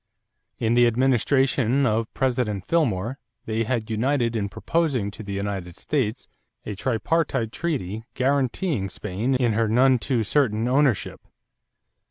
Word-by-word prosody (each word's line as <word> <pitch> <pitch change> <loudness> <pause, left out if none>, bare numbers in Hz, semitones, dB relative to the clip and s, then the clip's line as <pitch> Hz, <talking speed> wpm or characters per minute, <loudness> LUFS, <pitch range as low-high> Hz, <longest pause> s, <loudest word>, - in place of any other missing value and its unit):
In 115 0 +1
the 120 0 +5
administration 130 +1 +2
of 115 -1 0
President 120 -7 0
Fillmore 130 - 0 0.3
they 110 +1 -1
had 115 -1 -2
united 120 +1 +1
in 100 -2 -1
proposing 135 -8 -1
to 110 - -10
the 100 -2 -6
United 100 -3 -4
States 130 -5 -2 0.4
a 105 - -4
tripartite 130 - 0
treaty 115 - -3
guaranteeing 130 - 0
Spain 105 +8 -2
in 125 -3 +2
her 115 +1 +1
none 125 +3 +4
too 120 -2 0
certain 115 -2 +1
ownership. 130 -3 +1
120 Hz, 130 wpm, -24 LUFS, 110-135 Hz, 0.4 s, the